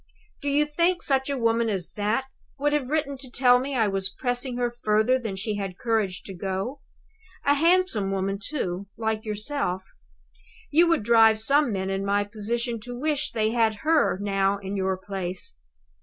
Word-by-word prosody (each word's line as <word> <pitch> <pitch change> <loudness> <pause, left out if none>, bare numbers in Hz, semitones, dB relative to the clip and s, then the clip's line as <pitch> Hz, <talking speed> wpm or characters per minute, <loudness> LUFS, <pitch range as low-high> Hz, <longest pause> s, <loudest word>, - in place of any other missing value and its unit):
Do 285 - -1
you 290 +1 +3
think 340 +4 +1
such 265 0 +1
a 280 - -1
woman 230 -1 +2
as 185 -4 -3
that 215 +5 -1 0.3
would 290 +1 +1
have 280 -4 0
written 280 -3 -1
to 260 -1 -8
tell 245 0 +4
me 270 +2 -3
I 225 -4 +3
was 195 -1 0
pressing 245 +4 -2
her 245 -1 0
further 235 +2 +2
than 220 -6 -4
she 210 +2 -3
had 195 -3 -4
courage 220 -5 -1
to 195 - -8
go? 195 +9 -4 0.6
A 285 - +5
handsome 330 - +3
woman, 195 0 -1
too, 200 -9 -3
like 220 0 -2
yourself. 210 -3 -1 0.9
You 335 +4 +5
would 330 -9 +2
drive 225 -1 +5
some 275 +3 +3
men 190 -1 -2
in 195 0 -1
my 200 +1 +1
position 230 +3 -3
to 245 +2 -8
wish 300 0 0
they 220 -1 0
had 225 -2 +2
her 315 - +3
now 195 0 +1
in 195 0 -5
your 190 -1 0
place. 185 - -5
225 Hz, 180 wpm, -25 LUFS, 195-270 Hz, 0.9 s, A